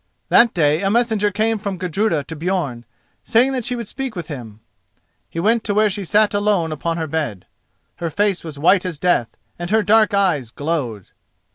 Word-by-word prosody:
That 235 -2 +5
day 155 -1 +2
a 195 - +1
messenger 220 -2 +2
came 220 +2 0
from 195 -2 -4
Gudruda 180 -2 0
to 160 - -8
Björn, 150 -8 -2 0.4
saying 245 +4 +3
that 255 -2 -2
she 245 +2 -1
would 235 -3 -5
speak 265 -2 -5
with 170 -4 -6
him. 115 -8 -8 0.7
He 165 - -5
went 220 +5 +2
to 205 - -1
where 215 0 +3
she 200 +1 -4
sat 210 +4 +3
alone 205 -5 +1
upon 165 +2 -2
her 165 - -2
bed. 145 - -3 0.5
Her 170 - -3
face 200 +2 0
was 155 -3 -8
white 180 +6 +4
as 180 -4 -3
death, 145 -10 0 0.2
and 175 0 -4
her 220 +1 +3
dark 215 0 +4
eyes 175 - +1
glowed. 130 - -3
185 Hz, 190 wpm, -20 LUFS, 155-215 Hz, 0.7 s, That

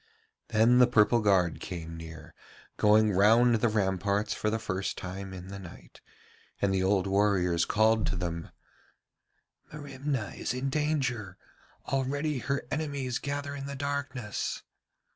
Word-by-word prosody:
Then 115 +3 +4
the 125 - +7
purple 120 -1 +4
guard 95 -5 +2
came 85 -2 -6
near, 80 0 -10 0.4
going 105 0 +4
round 115 +5 +5
the 115 +1 +2
ramparts 100 0 0
for 110 - -1
the 110 - 0
first 95 -3 -3
time 95 +1 -6
in 95 0 -9
the 100 0 -7
night, 90 -3 -13 0.6
and 100 -1 +1
the 95 - +1
old 95 0 +2
warriors 95 -4 +2
called 110 0 +3
to - - -1
them, 85 -2 -4 1.2
'Merimna 140 -5 -4
is - - -3
in 135 +1 -2
danger! 130 -10 -1 0.5
Already 140 +2 -1
her 140 +2 -2
enemies 140 -5 -2
gather 140 0 -4
in 140 -1 -6
the 140 - -5
darkness.' 140 -5 -3
110 Hz, 140 wpm, -29 LUFS, 95-135 Hz, 1.2 s, the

